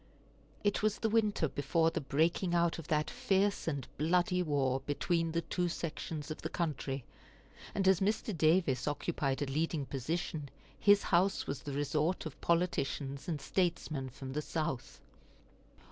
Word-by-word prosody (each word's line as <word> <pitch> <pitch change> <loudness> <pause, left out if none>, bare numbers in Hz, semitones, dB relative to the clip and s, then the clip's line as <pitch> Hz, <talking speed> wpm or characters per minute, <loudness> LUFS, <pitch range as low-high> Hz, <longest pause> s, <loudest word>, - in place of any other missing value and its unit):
It 205 -1 +2
was 215 0 +2
the 225 - 0
winter 210 -7 +2
before 160 +4 +1
the - - -2
breaking 165 +6 +1
out 170 -1 +2
of 160 - -8
that 150 -2 +1
fierce 195 0 +1
and 140 -6 -2
bloody 180 +3 +2
war 140 -5 +1
between 165 +4 0
the 170 +1 0
two 175 +2 -1
sections 155 -2 -4
of 155 - -6
the - - -3
country; 140 -5 -2 0.7
and 195 -1 +1
as 190 -2 +6
Mr. 210 +1 0
Davis 155 -5 +3
occupied 145 -2 -1
a - - -1
leading 150 +1 -1
position, 145 +2 -3 0.3
his 205 0 +6
house 185 +3 +2
was 140 - -4
the 145 - -5
resort 150 +5 0
of 155 - -7
politicians 145 -5 0
and 160 -4 -1
statesmen 155 -4 -1
from 130 +1 -7
the 150 - -1
South. 150 -5 -3
160 Hz, 155 wpm, -33 LUFS, 140-175 Hz, 0.7 s, as